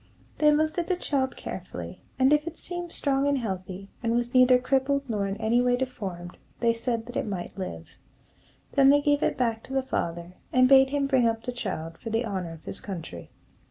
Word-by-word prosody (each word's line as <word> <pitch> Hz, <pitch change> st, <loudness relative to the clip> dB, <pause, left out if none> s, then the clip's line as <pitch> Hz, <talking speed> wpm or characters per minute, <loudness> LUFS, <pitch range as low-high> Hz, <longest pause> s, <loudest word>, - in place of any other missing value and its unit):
They 300 Hz, -1 st, +6 dB
looked 310 Hz, +3 st, +1 dB
at 340 Hz, -, -2 dB
the 370 Hz, -, +1 dB
child 275 Hz, -6 st, -1 dB
carefully, -, -, -7 dB, 0.2 s
and 265 Hz, +2 st, +4 dB
if 300 Hz, +2 st, +2 dB
it 335 Hz, -, -5 dB
seemed 350 Hz, -1 st, -3 dB
strong 275 Hz, -2 st, +1 dB
and 285 Hz, -1 st, +2 dB
healthy, 190 Hz, -4 st, -5 dB
and 230 Hz, 0 st, 0 dB
was 240 Hz, +1 st, -1 dB
neither 255 Hz, 0 st, +7 dB
crippled 270 Hz, +2 st, 0 dB
nor 205 Hz, -4 st, -1 dB
in 195 Hz, +1 st, -3 dB
any 225 Hz, +3 st, +2 dB
way 245 Hz, 0 st, +3 dB
deformed, 195 Hz, -9 st, -5 dB, 0.2 s
they 230 Hz, -1 st, +3 dB
said 230 Hz, -1 st, -2 dB
that 245 Hz, +1 st, -10 dB
it -, -, -1 dB
might 185 Hz, -4 st, -5 dB
live. 85 Hz, -, -6 dB, 0.8 s
Then 275 Hz, -1 st, +5 dB
they 290 Hz, +1 st, +6 dB
gave 290 Hz, 0 st, +2 dB
it -, -, 0 dB
back 230 Hz, -3 st, 0 dB
to 265 Hz, -, -8 dB
the 270 Hz, -1 st, +1 dB
father, 170 Hz, -6 st, -3 dB
and 255 Hz, 0 st, +5 dB
bade 265 Hz, 0 st, +7 dB
him 285 Hz, 0 st, 0 dB
bring 260 Hz, -4 st, +3 dB
up 225 Hz, 0 st, -1 dB
the 250 Hz, -, -3 dB
child 185 Hz, -9 st, -5 dB
for 230 Hz, -, -6 dB
the 225 Hz, +2 st, 0 dB
honor 185 Hz, -6 st, -4 dB
of 160 Hz, -, -13 dB
his -, -, -5 dB
country. 165 Hz, -, -7 dB
245 Hz, 215 wpm, -27 LUFS, 200-275 Hz, 0.8 s, neither